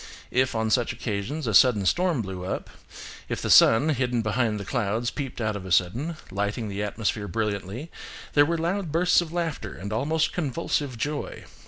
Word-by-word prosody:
If 130 Hz, -1 st, +1 dB
on 110 Hz, 0 st, 0 dB
such 120 Hz, -1 st, +2 dB
occasions 120 Hz, +8 st, -3 dB
a 115 Hz, -, -1 dB
sudden 105 Hz, -2 st, +5 dB
storm 175 Hz, -, +2 dB
blew 95 Hz, -2 st, -6 dB
up, 90 Hz, -, -4 dB, 0.6 s
if -, -, -2 dB
the -, -, -1 dB
sun, 140 Hz, +8 st, +7 dB
hidden 125 Hz, -5 st, 0 dB
behind 110 Hz, 0 st, 0 dB
the 100 Hz, -, -6 dB
clouds, 115 Hz, +1 st, -1 dB
peeped 135 Hz, -4 st, -5 dB
out 110 Hz, -2 st, -1 dB
of 100 Hz, -, -5 dB
a 95 Hz, -, -8 dB
sudden, 120 Hz, -, +1 dB
lighting 105 Hz, +3 st, -2 dB
the 100 Hz, +1 st, -4 dB
atmosphere 105 Hz, 0 st, -2 dB
brilliantly, 105 Hz, -, -3 dB, 0.4 s
there 145 Hz, -, +6 dB
were 170 Hz, +1 st, 0 dB
loud 175 Hz, +1 st, -1 dB
bursts 175 Hz, +3 st, +4 dB
of 165 Hz, -2 st, -6 dB
laughter 165 Hz, -, -3 dB
and 100 Hz, +4 st, -6 dB
almost 155 Hz, +7 st, 0 dB
convulsive 145 Hz, -4 st, -2 dB
joy. 145 Hz, +5 st, -4 dB
120 Hz, 180 wpm, -26 LUFS, 105-150 Hz, 0.6 s, sun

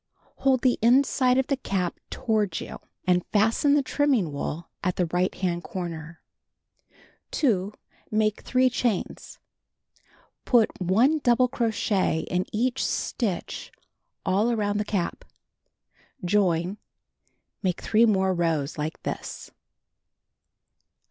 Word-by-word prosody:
Hold 265 Hz, -2 st, +2 dB
the 255 Hz, -2 st, +3 dB
inside 255 Hz, +1 st, +4 dB
of 265 Hz, -, +2 dB
the 275 Hz, -, 0 dB
cap 185 Hz, -8 st, -2 dB
toward 210 Hz, -7 st, 0 dB
you, -, -, -8 dB, 0.3 s
and 180 Hz, -1 st, +3 dB
fasten 225 Hz, +7 st, +3 dB
the 290 Hz, -, +3 dB
trinnning 260 Hz, -, +1 dB
wool 150 Hz, +3 st, -4 dB, 0.2 s
at 180 Hz, -1 st, 0 dB
the 180 Hz, -, +1 dB
right 180 Hz, +3 st, 0 dB
hand 175 Hz, -2 st, -2 dB
corner. 170 Hz, -2 st, -6 dB, 1.1 s
2. 205 Hz, -, +1 dB, 0.4 s
Make 215 Hz, -1 st, +1 dB
3 255 Hz, 0 st, +2 dB
chains. 235 Hz, -5 st, -2 dB, 1.1 s
Put 235 Hz, -4 st, +4 dB
1 230 Hz, -, +3 dB
double 250 Hz, -2 st, +3 dB
crochet 220 Hz, -8 st, 0 dB
in 180 Hz, +1 st, 0 dB
each 245 Hz, +4 st, 0 dB
stitch 210 Hz, -8 st, -2 dB, 0.5 s
all 200 Hz, +5 st, +2 dB
around 210 Hz, -3 st, 0 dB
the 210 Hz, -, -1 dB
cap. 195 Hz, -5 st, -2 dB, 1.0 s
Join. 185 Hz, 0 st, +1 dB, 0.8 s
Make 185 Hz, -3 st, -1 dB
3 225 Hz, +2 st, +3 dB
more 190 Hz, -3 st, +2 dB
rows 165 Hz, -4 st, -1 dB
like 155 Hz, +1 st, -4 dB
this. -, -, -6 dB
205 Hz, 115 wpm, -26 LUFS, 180-240 Hz, 1.1 s, inside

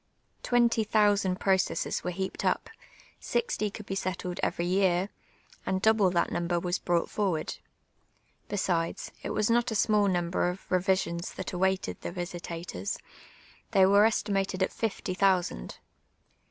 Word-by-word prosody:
Twenty 235 Hz, -2 st, +3 dB
thousaml 205 Hz, -3 st, +2 dB
proeesses 190 Hz, -4 st, 0 dB
were 180 Hz, -, -1 dB
heajH'd 190 Hz, +2 st, -4 dB
uj); -, -, +2 dB, 0.6 s
sixty 470 Hz, -, -1 dB
^o\il(l 210 Hz, +1 st, -9 dB
be 195 Hz, -, -4 dB
settled 185 Hz, -2 st, -3 dB
every 170 Hz, -, 0 dB
year, 185 Hz, 0 st, +2 dB, 0.5 s
and 190 Hz, -, 0 dB
double 220 Hz, -2 st, +4 dB
that 175 Hz, -1 st, +1 dB
number 175 Hz, 0 st, 0 dB
was 180 Hz, +1 st, -1 dB
)iou<j:ht 175 Hz, -1 st, +1 dB
forward. 190 Hz, -7 st, -1 dB, 0.9 s
Hesides, 175 Hz, -4 st, -1 dB
it -, -, -5 dB
was 215 Hz, +2 st, +1 dB
not 240 Hz, +1 st, +3 dB
a 220 Hz, -, -3 dB
snudl 210 Hz, -1 st, +3 dB
nuinbrr 175 Hz, 0 st, 0 dB
of 185 Hz, -, -15 dB
revi 185 Hz, +1 st, +2 dB
>i(>n.s 170 Hz, +1 st, -4 dB
that -, -, -6 dB
awaited 190 Hz, +1 st, 0 dB
the -, -, -4 dB
vi.sitators," 170 Hz, -, -5 dB, 0.4 s
— -, -, -27 dB
they 190 Hz, -1 st, +6 dB
were 200 Hz, +2 st, +6 dB
estimated 195 Hz, -3 st, 0 dB
at -, -, 0 dB
iftv 195 Hz, -4 st, -3 dB
thousand. 180 Hz, -, +1 dB
190 Hz, 145 wpm, -29 LUFS, 175-205 Hz, 0.9 s, they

